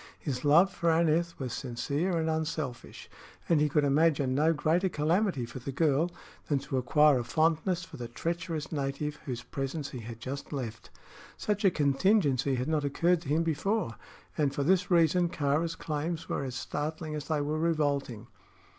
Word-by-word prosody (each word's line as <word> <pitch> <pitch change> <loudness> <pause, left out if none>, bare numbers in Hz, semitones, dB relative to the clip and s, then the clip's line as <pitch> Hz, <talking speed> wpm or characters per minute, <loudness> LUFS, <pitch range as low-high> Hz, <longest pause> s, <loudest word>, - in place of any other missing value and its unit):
His 130 -5 -4
love 170 +7 +5
for 170 - 0
Aneth 165 +1 +2
was 130 -4 -4
sincere 140 +8 -2
and 160 -1 0
unselfish, 155 -5 -3 0.4
and 165 -3 +3
he 150 - +3
could 150 +1 +2
imagine 140 -2 +3
no 150 +4 +3
greater 165 +4 +1
calamity 165 - +1
for 125 - -8
the 130 +3 -5
girl 150 +3 +2 0.4
than 145 - +2
to 135 0 -3
acquire 145 +2 +4
a - - -2
fondness 165 +6 +1
for - - -10
the 120 -1 -5
treacherous 165 +4 -4
native 145 0 -2
whose 120 -2 -4
presence 135 +3 -4
he 125 - -6
had 115 0 -8
just 140 +3 -6
left. 120 -6 -5 0.5
Such 210 0 -1
a 195 - +6
contingency 145 - +2
had 125 +2 -2
not 155 -2 +1
occurred 165 +5 +2
to 140 - -8
him 160 +3 +2
before, 165 - -1 0.4
and 140 -2 0
for 140 - 0
this 180 +4 +2
reason 175 0 +4
Kāra's 155 +3 0
claims 160 +2 -3
were - - -2
as 130 -2 -5
startling 155 +3 -4
as 150 -1 -5
they 155 -2 0
were 150 +2 -1
revolting. 145 -8 0
150 Hz, 175 wpm, -29 LUFS, 135-165 Hz, 0.5 s, a